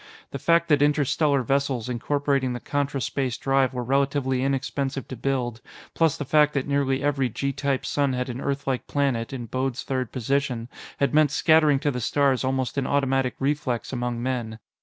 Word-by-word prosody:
The 140 Hz, -, -5 dB
fact 170 Hz, +4 st, +3 dB
that 145 Hz, -2 st, +4 dB
interstellar 145 Hz, -1 st, +2 dB
vessels 135 Hz, -2 st, 0 dB
incorporating 135 Hz, +1 st, 0 dB
the 120 Hz, -, -4 dB
contraspace 140 Hz, -2 st, -2 dB
drive 135 Hz, -1 st, +2 dB
were 125 Hz, -1 st, -3 dB
relatively 135 Hz, 0 st, +1 dB
inexpensive 135 Hz, 0 st, -2 dB
to 130 Hz, -, -5 dB
build, 120 Hz, -2 st, -2 dB, 0.3 s
plus 165 Hz, -1 st, +2 dB
the 145 Hz, -, -4 dB
fact 150 Hz, +1 st, +3 dB
that 135 Hz, -, 0 dB
nearly 140 Hz, -1 st, 0 dB
every 135 Hz, -3 st, +1 dB
G 140 Hz, +5 st, -2 dB
type 135 Hz, 0 st, -1 dB
sun 140 Hz, -2 st, 0 dB
had 125 Hz, 0 st, -2 dB
an 125 Hz, +1 st, -5 dB
Earth 140 Hz, 0 st, -2 dB
like 130 Hz, -2 st, -2 dB
planet 135 Hz, -5 st, 0 dB
in 125 Hz, -3 st, -5 dB
Bode's 130 Hz, +2 st, -2 dB
Third 130 Hz, -3 st, -2 dB
Position, 130 Hz, -2 st, -1 dB, 0.3 s
had 140 Hz, -, +1 dB
made 155 Hz, -1 st, +5 dB
scattering 155 Hz, -1 st, +4 dB
to 145 Hz, -, +1 dB
the 125 Hz, -2 st, -4 dB
stars 135 Hz, +2 st, +2 dB
almost 130 Hz, +1 st, -1 dB
an 130 Hz, -, -2 dB
automatic 135 Hz, -2 st, +1 dB
reflex 135 Hz, -3 st, -2 dB
among 120 Hz, -1 st, -2 dB
men. 120 Hz, -4 st, -2 dB
135 Hz, 180 wpm, -25 LUFS, 125-140 Hz, 0.3 s, made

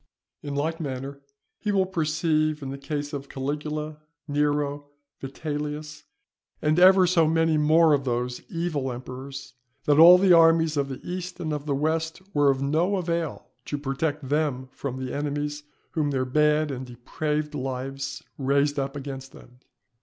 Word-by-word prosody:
In 145 Hz, -1 st, -5 dB
like 160 Hz, +4 st, -1 dB
manner 140 Hz, -1 st, -5 dB, 0.4 s
he 210 Hz, -, -1 dB
will 195 Hz, -2 st, +3 dB
perceive 155 Hz, -3 st, 0 dB
in 135 Hz, -, -4 dB
the 135 Hz, -, -5 dB
case 145 Hz, +1 st, -4 dB
of 140 Hz, -1 st, -5 dB
Caligula, 150 Hz, +2 st, -4 dB, 0.3 s
Nero, 145 Hz, 0 st, 0 dB, 0.3 s
Vitellius, 150 Hz, +2 st, -5 dB, 0.5 s
and 155 Hz, +3 st, +2 dB
ever 185 Hz, +1 st, +7 dB
so 170 Hz, -3 st, +3 dB
many 165 Hz, 0 st, +2 dB
more 155 Hz, +1 st, +5 dB
of 140 Hz, -1 st, +2 dB
those 125 Hz, -1 st, -2 dB
evil 160 Hz, -6 st, -2 dB
emperors, 130 Hz, +3 st, -8 dB, 0.3 s
that 145 Hz, 0 st, +4 dB
all 175 Hz, +2 st, +10 dB
the 185 Hz, -1 st, +5 dB
armies 165 Hz, -1 st, +5 dB
of 140 Hz, -1 st, 0 dB
the 135 Hz, -, -6 dB
east 180 Hz, 0 st, -5 dB
and 155 Hz, -2 st, -2 dB
of 150 Hz, 0 st, -5 dB
the 140 Hz, -, +1 dB
west 160 Hz, +3 st, -1 dB
were 145 Hz, -1 st, +4 dB
of 135 Hz, 0 st, +1 dB
no 165 Hz, +8 st, +1 dB
avail 170 Hz, -4 st, -3 dB
to 145 Hz, -, -3 dB
protect 145 Hz, +1 st, -2 dB
them 140 Hz, -3 st, -1 dB
from 130 Hz, -2 st, -5 dB
the 130 Hz, -1 st, -4 dB
enemies 145 Hz, 0 st, -2 dB, 0.3 s
whom 150 Hz, -3 st, 0 dB
their 130 Hz, -2 st, 0 dB
bad 150 Hz, +2 st, +2 dB
and 130 Hz, -1 st, -5 dB
depraved 150 Hz, +5 st, -3 dB
lives 135 Hz, 0 st, -4 dB, 0.2 s
raised 140 Hz, +2 st, +2 dB
up 135 Hz, +1 st, -3 dB
against 135 Hz, -1 st, -7 dB
them. 125 Hz, 0 st, -16 dB
150 Hz, 160 wpm, -25 LUFS, 135-160 Hz, 0.5 s, all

